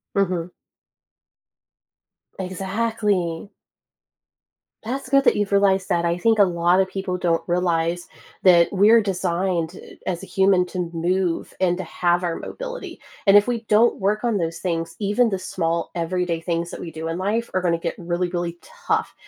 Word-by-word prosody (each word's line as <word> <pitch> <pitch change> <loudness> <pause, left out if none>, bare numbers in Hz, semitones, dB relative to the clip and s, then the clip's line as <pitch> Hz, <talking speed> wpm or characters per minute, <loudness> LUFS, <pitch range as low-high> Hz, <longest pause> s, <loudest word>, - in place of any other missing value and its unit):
Mhm. 180 -3 0 1.9
Exactly. 195 -2 -2 1.4
That's 260 +3 -4
good 275 0 +4
that - - +5
you've 205 -1 -1
realized 195 -1 +3
that, 170 -1 +1
I 170 0 +1
think 220 +4 +2
a - - +8
lotta 175 +1 +2
people 190 -1 -4
don't 170 -2 0
realize 175 -1 0 0.4
that 175 -2 +6
we're 210 +4 +5
designed, 180 -3 -1
uh, - - -12
as 175 0 -3
a - - -6
human 190 -1 +3
to 180 -2 -4
move 175 +1 -1
and 180 -2 +2
to 185 - -4
have 175 +1 0
our 170 -2 -1
mobility, - - -7 0.3
and 195 - +7
if 205 0 +7
we 235 -2 -3
don't 220 +3 +4
work 210 +3 0
on 235 -3 +1
those 165 -2 -3
things, 165 -2 -3
even 210 +4 +2
the 195 - -1
small 170 -2 -2
everyday 170 0 -1
things 170 0 -2
that - - -7
we 170 - -7
do 160 +1 -5
in 165 - -3
life 215 +5 -1
are 185 - +1
gonna 170 -2 +1
get 165 0 -3
really, 175 +1 -2
really 175 -1 -3
tough, - - -3
180 Hz, 165 wpm, -22 LUFS, 170-200 Hz, 1.9 s, a